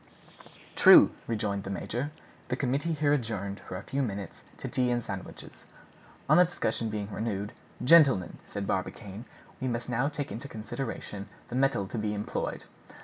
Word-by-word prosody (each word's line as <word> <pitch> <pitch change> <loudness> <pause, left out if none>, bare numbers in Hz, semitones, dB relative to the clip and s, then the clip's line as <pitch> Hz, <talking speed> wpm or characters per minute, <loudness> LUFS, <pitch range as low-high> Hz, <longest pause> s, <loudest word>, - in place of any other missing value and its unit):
"True," - - +9 0.2
rejoined 105 -3 -1
the - - -6
major. 120 +8 -3 0.4
The 125 - 0
committee 140 +5 0
here 145 -1 +2
adjourned 105 -7 -2
for - - -8
a 95 - -7
few 140 +1 -2
minutes 100 -6 -4
to - - -5
tea 125 -2 +1
and 120 -1 0
sandwiches. 95 -1 -7 0.8
On - - +6
the 180 - +9
discussion 115 -9 -2
being 105 -1 -4
renewed, 105 -2 -3 0.3
"Gentlemen," 135 - +6
said 100 -1 -5
Barbicane, 100 +3 -3 0.4
"we 130 - 0
must 120 0 -2
now 125 +4 +1
take 145 -5 -4
into 115 +7 -6
consideration 110 -3 -5 0.2
the 120 - -4
metal 130 -6 +2
to 110 +4 -4
be 105 0 -1
employed. 105 +1 -3
115 Hz, 160 wpm, -29 LUFS, 100-135 Hz, 0.8 s, True